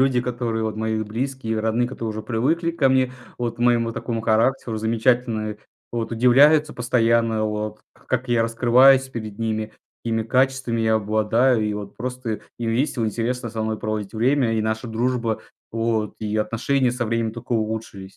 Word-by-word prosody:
люди, 130 -2 +3
которые, 120 -2 -2
вот, 110 -1 -3
мои 110 0 -1
близкие, 115 0 -3
родные, 115 +2 +1
которые 115 -3 -4
уже 110 0 -5
привыкли 150 +10 0
ко 155 -5 +2
мне, 130 -1 +2 0.3
вот 120 -1 -2
к - - -23
моему 120 -1 +2
такому 115 -1 -3
характеру, 115 +1 +1
замечательное, 115 -1 0 0.3
вот, 115 -1 -2
удивляются 145 +6 +5
постоянно, 115 -2 +1
вот, 105 0 -3
к - - -26
как 130 0 -1
я 120 -1 +3
раскрываюсь 130 +4 +5
перед 110 -4 -6
ними, 110 -1 -2 0.3
какими 115 -1 -1
качествами 130 0 +1
я 110 0 +2
обладаю. 110 +3 +2
И, 105 -1 -1
вот, 105 -1 -7
просто 125 -2 -4 0.2
им 115 -1 -1
весело, 120 0 0
интересно 120 +3 -2
со 110 0 -3
мной 110 0 -2
проводить 110 -1 -4
время. 120 0 +2
И 110 - 0
наша 110 +2 -2
дружба, 115 0 -1 0.3
вот, 115 -2 -1
и 110 0 -2
отношения 125 +4 +1
со 120 0 -2
временем 115 0 -1
тока 120 +1 -7
улучшились. 110 -4 -3
115 Hz, 170 wpm, -23 LUFS, 110-125 Hz, 0.3 s, удивляются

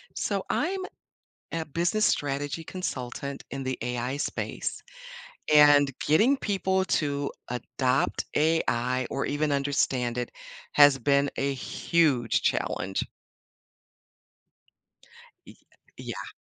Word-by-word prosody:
So, - - -1
I'm 385 +2 0 0.7
a 165 -1 -2
business 175 +8 +1
strategy 145 +3 -1
consultant 140 -6 -5
in 135 -1 -5
the 130 0 -2
AI 125 +2 -2
space, 145 - -4 0.7
and 145 -2 +7
getting 230 - +4
people 190 -3 0
to 145 -2 -1 0.2
adopt 125 +1 0
AI 130 -5 +1
or 135 - -2
even 145 +1 0
understand 135 -3 0
it 125 -1 -3 0.4
has 145 -2 +7
been 140 +2 +2
a 140 0 0
huge 135 -2 +1
challenge. 95 0 -1 2.4
Y - - -13 0.4
yeah. - - -6
140 Hz, 100 wpm, -27 LUFS, 130-160 Hz, 2.4 s, and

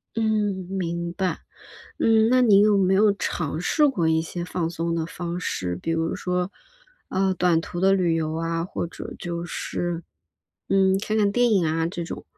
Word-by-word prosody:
嗯， 210 -4 0
明 170 -2 -3
白。 185 0 -1 0.6
嗯， 225 0 +4
那 255 0 +5
您 205 -5 +6
有 205 -1 +4
没 190 0 +3
有 205 +1 +5
尝 160 -5 -3
试 295 - +3
过 175 -12 0
一 160 0 +2
些 170 +1 -5
放 175 -2 -2
松 170 0 -2
的 165 -1 -1
方 175 +1 -5
式， 90 - -2
比 165 - -2
如 165 0 0
说， 180 +1 -2 0.6
呃， 190 0 +1
短 175 -2 +2
途 175 +1 -6
的 195 +1 +4
旅 180 -4 +2
游 160 -1 -1
啊， 165 0 -1
或 175 - -4
者 170 - -8
就 170 -1 -4
是， 175 0 -4 0.6
嗯， 190 -1 +3
看 215 +1 -2
看 205 -1 +2
电 245 +2 +3
影 190 -6 +3
啊 160 +1 0
这 175 -1 -5
种。 - - -7
180 Hz, 200 characters per minute, -24 LUFS, 165-195 Hz, 0.6 s, 您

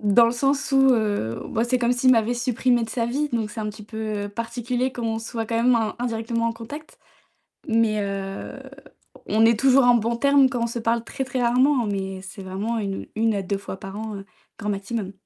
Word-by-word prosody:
Dans 210 +3 +5
le 230 - +2
sens 275 +3 0
où, - - +4 0.2
heu, 205 - -1 0.3
c'est 255 0 +2
comme 240 0 +2
s'il 250 +1 +3
m'avait 230 0 +2
supprimé 245 0 +1
de 225 - -3
sa 235 -2 -1
vie, 285 +5 -1
donc 220 -3 -1
c'est 225 - -6
un 210 - -2
petit 210 +1 -9
peu 215 -2 -4
particulier 240 +4 -2
comme 240 -2 -4
on 225 0 -1
se 225 - -8
voit 225 -1 -2
quand 230 +1 -2
même 250 0 +5 0.2
indirectement 230 -1 -1
en - - -2
contact, 265 +8 -10 0.7
mais 225 -2 +2
heu, 195 -1 -5 0.7
on 220 +1 +3
est 230 -1 +3
toujours 270 +1 +5
en 245 0 +6
bons 235 +1 +1
termes 280 +1 +5
quand 245 -3 -2
on - - +1
se 235 0 -4
parle 230 0 0
très 265 - -4
très 260 -1 -3
rarement, 250 +1 +3
mais 195 -2 -3
c'est 195 +1 -9
vraiment 200 +5 -3
u 195 -2 -4
1 225 0 +2
à 200 - -1
2 195 +1 -2
fois 195 -1 -7
par 195 +1 -8
an, 215 -2 -5 0.4
grand 210 - -5
maximum. 200 0 -3
230 Hz, 215 wpm, -24 LUFS, 210-245 Hz, 0.7 s, en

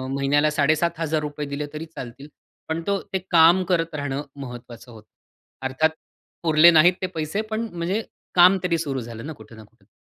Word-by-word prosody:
महिन्याला 145 +2 +2
₹7500 155 -1 0
दिले 140 +1 -4
तरी 155 +2 -6
चालतील. 125 +3 -9 0.4
पण 160 +1 -2
तो 200 -1 0
ते 190 - +1
काम 170 +2 +6
करत 165 -3 -1
राहणं 140 -1 -3
महत्वाचं 120 -2 -10
होतं. 110 -2 -15 0.6
अर्थात 130 +4 +2 0.5
पुरले 160 +1 +6
नाहीत 170 +3 +6
ते 185 - -1
पैसे, 165 +2 -3
पण 220 +1 -4
म्हणजे 175 +5 -2 0.3
काम 180 +2 +7
तरी 175 -2 +1
सुरू 140 -5 -3
झालं 115 +1 -8
ना 160 - -6
कुठे 120 - -15
ना 110 - -12
कुठे. 105 -1 -26
155 Hz, 170 wpm, -23 LUFS, 135-170 Hz, 0.6 s, काम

